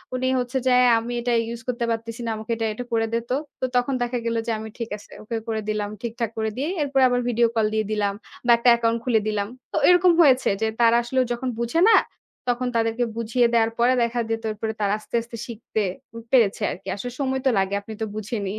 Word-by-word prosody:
উনি 255 0 -1
হচ্ছে 250 +2 -2
যে 260 - +3
"অ্যা 245 - +5
আমি 235 +2 -5
এটা 240 0 -1 0.2
use 235 -1 -9
করতে 240 -1 -1
পারতেছি 230 +1 -4
না। - - -2
আমাকে 220 +1 -6
এটা 225 0 -2
এটু 245 - -5
করে 225 0 +2
দে - - +3
তো।" 255 - +1 0.2
তো - - 0
তখন 245 +2 +2
দেখা 245 +1 -1
গেল 230 0 0
যে - - +1
আমি 220 0 -7
ঠিক 230 -2 -4
আছে 205 - -17
ওকে 225 +1 -3
করে 220 -1 -1
দিলাম। 210 -1 -1
ঠিকঠাক 235 -1 -3
করে 220 0 0
দিয়ে 285 +5 -1
এরপরে 275 -2 +2
আবার 245 0 +1
video 235 0 +3
call 220 -1 +3
দিয়ে 220 0 0
দিলাম 205 -2 0 0.3
বা 240 - +5
একটা 235 +1 +4
account 230 0 +1
খুলে 235 -3 +3
দিলাম। 205 -2 -1 0.2
তো - - -2
এরকম 360 0 +6
হয়েছে 265 -5 +5
যে - - +2 0.2
তারা 230 0 +5
আসলে 260 +2 -1
যখন 250 +2 -3
বুঝে 235 +7 0
না, - - +7 0.5
তখন 245 +1 0
তাদেরকে 225 +1 +1
বুঝিয়ে 230 +1 +2
দেয়ার 225 -1 +3
পরে 245 +2 +4
দেখা 235 +1 -1
যেত 225 0 -1
এরপরে 220 +1 -4
তারা 200 0 +2
আস্তে, 215 - -7
আস্তে 230 0 -9
শিখতে 230 -1 -5 0.3
উম 230 - -8
পেরেছে 230 -6 +3
আরকি। 185 - -9
আসলে 245 +5 -5
সময় 265 -1 0
তো - - +5
লাগে। 195 +1 0
আপনি 220 +2 -9
তো - - +1
বুঝেনই, 210 -2 -3
230 Hz, 230 wpm, -23 LUFS, 220-245 Hz, 0.5 s, না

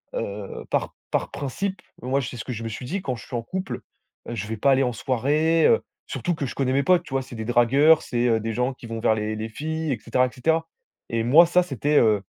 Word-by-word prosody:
heu, 100 0 -5
par - - -1 0.2
par - - -1
principe, 190 +8 -3 0.2
moi, 135 +3 0
c'est 125 - -5
ce 115 - -5
que 130 - -5
je 115 - -6
me - - -3
suis 120 +3 -6
dit: 185 +8 -3
«Quand 130 -6 -2
je 115 - -11
suis 125 - -7
en 115 - -1
couple, 185 +9 -4 0.5
heu, 120 - -4
je 105 0 -4
vais 110 0 -4
pas 140 +6 +3
aller 135 0 +4
en 125 - 0
soirée», 150 +8 +2
heu, 460 - +4 0.3
surtout 175 -2 -2
que 140 - -3
je - - -5
connais 130 -1 0
mes 140 +1 +2
potes, 180 -1 +4
tu 135 - -10
vois? 135 - +1
C'est 125 - -11
des 110 - -4
dragueurs, 135 +7 +5
c'est, 120 0 0
heu, 115 -1 +3
des 115 0 -3
gens 125 +3 0
qui 125 - -13
vont 115 0 -4
vers 110 -1 +3
les 110 0 -2
les 110 +1 -4
filles, 160 +5 -3
et - - -3
cetera, 130 +3 +1
et - - -9
cetera. 160 +5 0 0.4
Et 115 -1 0
moi, 155 +9 +7
ça, 180 +1 +3
c'était, 145 - 0
heu, 105 -3 +3
130 Hz, 265 wpm, -24 LUFS, 115-155 Hz, 0.5 s, moi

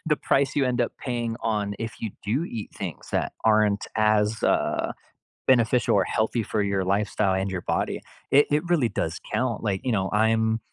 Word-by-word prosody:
the 150 - +2
price 135 -1 +1
you 140 - +3
end 125 -1 0
up 120 - 0
paying 120 -3 -3
on 105 -2 -1
if 115 0 -4
you 110 - -3
do 120 +10 0
eat 115 -10 -6
things 85 -9 -6
that - - 0
aren't 105 -2 +3
as, 110 0 +2
uh, - - +1 0.6
beneficial 120 -3 +3
or 95 - +4
healthy 110 +4 0
for 105 - -1
your 100 -1 0
lifestyle 100 +1 +1
and 95 +1 0
your 95 -2 -3
body. - - -1 0.3
It 145 +2 +6
it 150 +1 +2
really 150 -9 +3
does 85 -4 -3
count. 125 -4 -1
Like, 100 -3 -1
you 130 - 0
know, 95 -4 0
I'm 110 +1 +2
110 Hz, 190 wpm, -25 LUFS, 100-120 Hz, 0.6 s, It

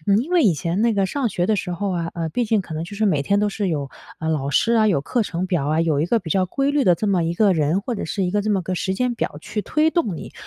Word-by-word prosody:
嗯， 200 +1 +5
因 285 +9 -3
为 350 - +4
以 190 -8 +4
前 170 +6 -2
那 235 -1 +3
个 195 -2 +1
上 265 +2 -1
学 180 -3 -1
的 220 - +2
时 185 -2 -3
候 195 +3 -2
啊， 170 -1 -2
呃， 165 -2 -2
毕 245 - 0
竟 220 -1 +1
可 160 - -8
能 155 - -3
就 200 +4 -8
是 215 0 +1
每 150 -7 +2
天 200 +8 +1
都 210 0 +2
是 200 -1 -2
有， 145 -4 -2 0.3
呃， 160 - -3
老 140 -3 -1
师 230 +10 +2
啊、 220 -1 +4
有 180 -9 +2
课 230 - 0
程 180 -2 -3
表 175 -7 -1
啊、 155 +2 +2
有 155 -4 +1
一 160 - +1
个 230 +4 +2
比 170 -6 -8
较 185 +1 +2
规 275 +8 0
律 290 -1 +2
的 180 -6 +5
这 215 - -2
么 190 -4 +2
一 165 +1 -1
个 200 0 +4
人 160 +3 +1
或 240 +4 -4
者 - - -4
是 195 -3 -2
一 180 - -1
个 205 -1 +1
这 215 - -1
么 200 -2 +2
个 185 +2 -3
时 190 +2 -1
间 245 +3 0
表 150 - -3
去 210 +4 -4
推 310 +1 +2
动 225 - 0
你， - - -9
190 Hz, 355 characters per minute, -22 LUFS, 165-220 Hz, 0.3 s, 嗯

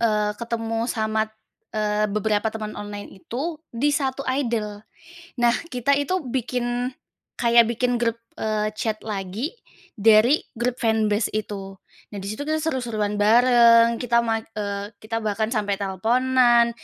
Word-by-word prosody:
eee, 210 -2 +2
ketemu 230 -1 -2
sama, 220 -2 0 0.5
eee, 210 0 +1
beberapa 210 +1 0
teman 215 -1 -5
online 205 0 -7
itu, 300 - -4
di 260 +5 +1
satu 275 -1 -1
idol. 230 -6 -2 0.6
Nah, 240 0 +4 0.2
kita 250 +3 +2
itu 365 +5 -1
bikin 245 0 -2 0.5
kayak 235 -1 +5
bikin 245 +1 0
grup, 230 -1 0 0.2
eee, 215 -1 0
chat 215 -1 -2
lagi 210 - -4 0.5
dari 220 +7 +5
grup 240 +1 -2
fanbase 220 -1 +1
itu. 200 -2 -4 0.4
Nah 205 - -6
di 195 - -5
situ 215 +7 -4
kita 310 0 0
seru-seruan 235 -9 -1
bareng, 235 +1 +6
kita 235 -1 +2
ma 225 -1 0
eee, 205 -1 -5
kita 225 +1 -3
bahkan 215 +1 0
sampai 210 -4 0
telponan, 235 +4 +3
225 Hz, 135 wpm, -23 LUFS, 210-245 Hz, 0.6 s, bareng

